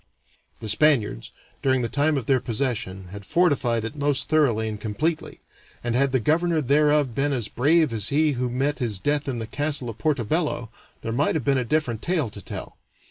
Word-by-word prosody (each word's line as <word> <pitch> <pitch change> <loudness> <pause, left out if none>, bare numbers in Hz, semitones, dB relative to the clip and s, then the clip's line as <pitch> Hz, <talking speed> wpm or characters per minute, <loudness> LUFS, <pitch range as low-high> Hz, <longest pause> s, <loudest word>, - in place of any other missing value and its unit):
The 110 - -5
Spaniards, 110 - +2 0.3
during 130 -2 +2
the - - 0
time 145 +4 +1
of 130 - -3
their 135 0 +3
possession, 105 -7 -3
had 100 +2 -9
fortified 125 - +1
it 115 - -6
most 145 -2 0
thoroughly 125 -8 +2
and 105 -1 -5
completely, 150 +10 -2 0.4
and 120 -1 -1
had 135 +1 +3
the 130 - +2
governor 165 +6 +2
thereof 145 -1 +3
been 140 +4 0
as 120 -5 -2
brave 150 +4 +2
as 105 -2 -2
he 150 +2 +3
who 125 -2 -2
met 135 +4 -1
his 115 -6 -1
death 145 +8 0
in 130 -3 -2
the 115 - -3
castle 140 0 -1
of 115 - -15
Porto 150 -6 +1
Bello, 145 -3 -1 0.3
there 115 - -3
might 140 +8 +1
have 155 - -1
been 135 -1 +3
a - - 0
different 125 -4 -1
tale 160 - -1
to 100 - -8
tell. - - -7
130 Hz, 200 wpm, -24 LUFS, 115-150 Hz, 0.4 s, their